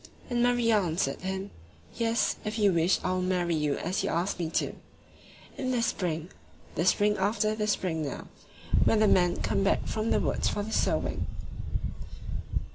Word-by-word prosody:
And 240 0 +2
Maria 240 -3 +4
answered 160 -5 -1
him: 190 +1 -3 0.4
"Yes... 230 0 +1
If 215 +1 -3
you 205 -3 +4
wish 170 +2 +3
I 185 - 0
will 185 0 0
marry 180 -2 +1
you 150 -2 +1
as 180 +3 -1
you - - 0
asked 175 +3 -1
me 165 -2 -1
to... - - 0 0.9
In 255 - -1
the 245 -2 +1
spring 170 -5 -1 0.4
the 170 - 0
spring 210 +2 +3
after 210 +2 +1
this 210 -1 +1
spring 160 -4 -2
now 145 - -4 0.6
when 225 - +4
the 215 0 +5
men 180 -3 +4
come 195 - +1
back 195 - +2
from 220 +1 -1
the - - +3
woods - - 0
for 205 - -2
the 220 - -6
sowing." - - 0
195 Hz, 175 wpm, -29 LUFS, 175-215 Hz, 0.9 s, the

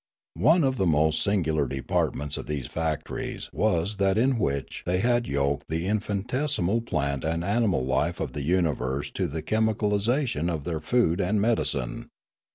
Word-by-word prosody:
One 165 +1 +5
of 130 -1 +1
the 95 - +2
most 80 0 +3
singular 80 -8 +1
departments 70 +2 -1
of - - -6
these 75 -4 -3
factories 80 -2 -4
was 100 -1 +1
that 100 0 +2
in 125 +1 +2
which 70 -7 -2
they 90 +1 0
had 120 +4 +1
yoked 70 0 -1
the 80 +2 -1
infinitesimal 110 - 0
plant 70 - -2
and 80 +1 -1
animal 100 - +1
life 65 +7 0
of 75 -6 -3
the 75 - -4
universe 70 -4 0
to 95 - -1
the 80 0 -5
chemical 110 +2 +1
isati 115 - +1
on 85 - 0
of 80 -4 -3
their 80 -1 -3
food 100 -4 +2
and 100 +3 +1
medi 115 +2 +2
cine. - - -3
90 Hz, 170 wpm, -26 LUFS, 75-110 Hz, -, One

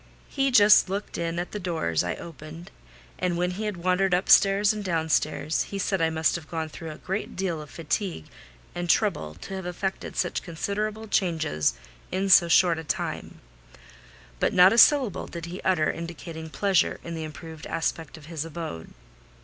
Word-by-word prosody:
He 275 -1 +1
just 210 -5 +6
looked 200 +2 -4
in 170 0 -2
at 175 +1 -3
the 210 - -4
doors 160 - -1
I 90 - -2
opened; 165 +1 -10 0.5
and 180 -2 0
when 180 +1 0
he 205 +4 -4
had 210 -3 -3
wandered 180 +1 +2
upstairs 195 +2 +5
and 210 -1 -5
downstairs, 160 -3 0
he 200 - -4
said 195 -2 -1
I 165 - +3
must 160 0 +1
have 165 -3 -7
gone 160 -2 -3
through 165 +1 -8
a 155 - -8
great 195 +3 -4
deal 175 -4 -2
of 150 - -11
fatigue 170 - -3 0.5
and 175 0 -4
trouble 80 - +1
to 140 - -9
have 190 -2 -5
effected 190 +2 -4
such 175 - -1
considerable 210 +6 -3
changes 160 - 0 0.4
in 195 +1 -1
so 175 -2 +7
short 170 -1 +4
a - - -6
time: 150 - -4 1.0
but - - +1
not 185 +2 +7
a - - 0
syllable 260 - +5
did 170 -1 -7
he 175 +2 -7
utter 170 -5 +2
indicating 165 -1 -7
pleasure 195 +1 +1
in 170 - -6
the 160 -1 -4
improved 160 0 -9
aspect 165 -1 -3
of 155 - -14
his 160 -1 -4
abode. 160 - -7
170 Hz, 180 wpm, -26 LUFS, 160-195 Hz, 1.0 s, so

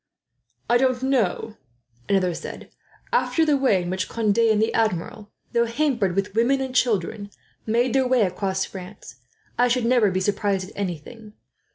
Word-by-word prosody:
"I 240 0 +3
don't 255 -1 +1
know," 230 -5 0 0.5
another 185 -3 +2
said, - - -8 0.4
"after 325 - +2
the 300 -2 +3
way 255 -10 +2
in 175 - -4
which 185 0 -2
Conde 220 -1 0
and 220 -2 +4
the 220 - +1
Admiral, 215 +1 -1 0.2
though 235 0 +2
hampered 230 -8 0
with 195 0 -1
women 240 +5 +2
and 265 -1 -4
children, 205 -4 0 0.4
made 235 +2 +1
their 265 -1 +2
way 250 -3 +3
across 190 0 -1
France, 185 - -11 0.4
I 245 - +5
should 245 -1 +1
never 235 -3 +4
be 185 0 -1
surprised 195 -1 -1
at - - -20
anything. 205 +4 -6
220 Hz, 165 wpm, -23 LUFS, 190-245 Hz, 0.5 s, I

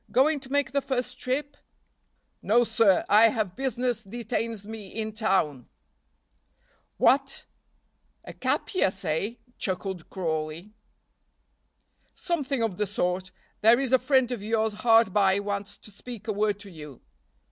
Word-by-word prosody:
Going 280 +6 +3
to 265 -1 -13
make 285 -3 +1
the 280 +1 +1
first 255 -2 -3
trip?" 285 +3 -2 0.9
"No, 235 +3 +4
sir! 220 -5 +3
I 215 +2 +7
have 215 -5 -1
business 250 -3 -1
detains 225 0 -4
me 215 -2 -7
in 220 +2 -5
town." 190 - 0 1.3
"What! 275 +1 +2 0.8
a - - -8
capias, 195 - 0
eh?" 175 +9 -1 0.2
chuckled 190 -2 -3
Crawley. 160 +2 -4 1.4
"Something 280 -8 -1
of 210 -6 -2
the 210 - 0
sort. 185 -1 -1 0.3
There 230 +3 +6
is 265 -2 -1
a 260 - +6
friend 260 -1 +2
of 240 -5 -3
yours 220 0 0
hard 225 -4 +5
by 195 -2 +4
wants 200 0 -4
to 210 - -13
speak 225 +1 -9
a 215 - 0
word 205 0 +1
to 200 -2 -9
you." 150 -5 -11
220 Hz, 135 wpm, -27 LUFS, 195-250 Hz, 1.4 s, I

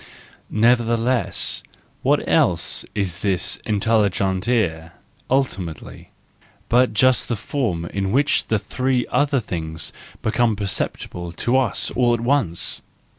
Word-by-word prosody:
Neverthe¬ 115 +1 +3
less, 120 +2 0 0.4
what - - +1
else - - +1
is 90 -4 -1
this 95 -4 0
intelligere 100 -4 +1 0.4
ultimately, 100 - -2 0.6
but 125 +2 +4
just 130 +4 +3
the 120 - -1
form 105 - -2
in 95 +2 -2
which 140 +5 +2
the 110 - +2
three 125 +5 -1
other 145 -2 +2
things 80 -7 -4 0.3
become 115 0 +2
perceptible 90 -3 -3
to 120 +8 0
us 130 -2 +1
all 120 -1 +2
at - - -5
once? 120 - +1
110 Hz, 115 wpm, -21 LUFS, 95-125 Hz, 0.6 s, but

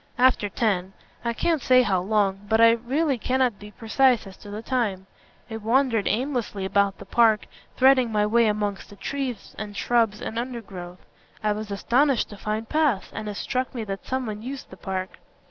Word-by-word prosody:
"After 245 -5 +3
ten. 195 -3 0 0.3
I 235 - 0
can't 320 +5 0
say 255 0 +5
how 190 -6 +1
long. 200 0 0
But 220 0 +3
I 230 0 +8
really 260 +4 0
cannot 255 -2 +1
be 210 - -10
precise 240 +3 +2
as 190 -1 -11
to 205 - -12
the 210 +2 -6
time. 215 -8 -1 0.4
I 220 - -5
wandered 230 0 +1
aimlessly 235 -4 -1
about 200 0 +1
the - - -11
park, 220 +1 +3 0.3
threading 260 -2 +5
my 210 -1 +2
way 230 +2 +3
amongst 210 -2 -2
the 205 - -12
trees 260 +3 -5
and 205 -1 -6
shrubs 225 -3 +2
and 225 - -4
undergrowth. 195 -8 -7 0.4
I 210 - +2
was 210 0 -4
astonished 245 +6 +1
to 205 - -9
find 215 +2 -3
paths, 300 -9 +1
and 215 -1 -5
it 205 - -5
struck 255 +4 -2
me 230 - -3
that 195 -2 -6
someone 240 -5 -3
used 265 +3 -7
the - - -9
park." 190 -1 -5
220 Hz, 185 wpm, -25 LUFS, 205-250 Hz, 0.4 s, I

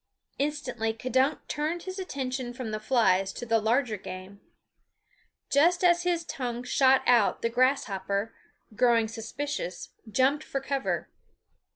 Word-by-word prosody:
Instantly 265 -6 -1
K'dunk 260 +5 0
turned 315 +3 -2
his 375 +1 -6
attention 260 -7 -4
from 240 -3 -5
the 215 - -2
flies 205 -5 +2
to - - -6
the 225 -1 +2
larger 225 0 +1
game. 185 +1 -9 1.1
Just 340 +6 +4
as 345 -1 +5
his 345 -1 0
tongue 245 -4 -4
shot 260 +1 +4
out 240 -4 +3
the 230 - +2
grasshopper, 225 -5 0 0.4
growing 230 -1 +3
suspicious, 225 -2 -5 0.2
jumped 270 +6 +2
for 275 - -3
cover. 270 0 -2
255 Hz, 130 wpm, -28 LUFS, 225-285 Hz, 1.1 s, as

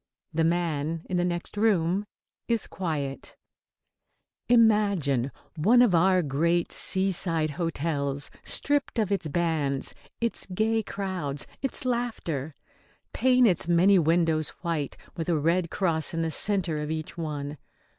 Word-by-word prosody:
The 160 +1 +1
man 165 -1 -1
in 180 - +1
the 175 - +2
next 175 +1 -3
room 200 -2 +1 0.4
is 230 -3 0
quiet. 150 -7 -4 1.1
Imagine 200 - +3 0.2
one 225 +10 +5
of 225 -7 +3
our 180 +1 +4
great 165 +5 +1
seaside 175 -5 +1
hotels 145 -4 -2
stripped 285 -3 0
of 215 -3 0
its 195 -5 0
bands, 150 -4 -1 0.3
its 235 0 -2
gay 225 +2 +2
crowds, 185 -9 -3 0.2
its 270 +1 -2
laughter. 220 - -2 0.6
Paint 255 -1 +4
its 180 -6 +2
many 180 +3 +5
windows 160 -1 +2
white, 160 -5 -2 0.2
with 165 0 -4
a 165 - +2
red 170 +3 +1
cross 165 -4 0
in 165 - 0
the 160 - -1
centre 180 -3 0
of 150 0 -4
each 155 -1 -4
one. 150 -3 -5
170 Hz, 130 wpm, -27 LUFS, 155-195 Hz, 1.1 s, one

